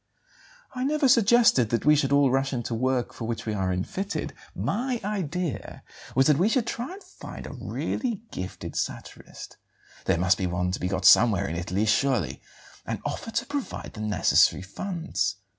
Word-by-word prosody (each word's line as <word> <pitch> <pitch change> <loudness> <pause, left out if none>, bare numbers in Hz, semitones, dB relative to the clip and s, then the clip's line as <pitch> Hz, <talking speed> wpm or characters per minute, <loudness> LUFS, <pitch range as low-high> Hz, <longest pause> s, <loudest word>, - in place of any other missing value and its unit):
"I 255 -1 -3
never 295 +1 +2
suggested 230 - +5
that 115 - -1
we 150 0 +6
should 140 -2 +1
all 140 -2 +4
rush 135 +1 +1
into 120 -1 -3
work 125 +1 0
for 115 - -6
which 115 0 -4
we 110 - -2
are 95 -2 -1
unfitted. 185 - -3 0.2
My 245 +3 -1
idea 180 - -3 0.3
was 135 +1 +4
that 150 0 +4
we 195 +5 +3
should 240 -1 +1
try 250 +11 -4
to 405 - -16
find - - -10
a - - -7
really 230 -5 -3
gifted 95 0 -6
satirist - - -6 0.5
there 95 - +2
must 95 +3 +2
be 95 - 0
one 90 +1 -1
to 95 - -3
be 90 - -1
got 95 0 -2
somewhere 100 -2 +6
in 80 - -4
Italy, 90 +5 -1
surely 120 - +1 0.4
and - - -4
offer - - -4
to 230 +2 -1
provide 285 -1 -5
the 110 - -7
necessary 105 -3 +3
funds. 165 - -3
135 Hz, 175 wpm, -26 LUFS, -, 0.5 s, we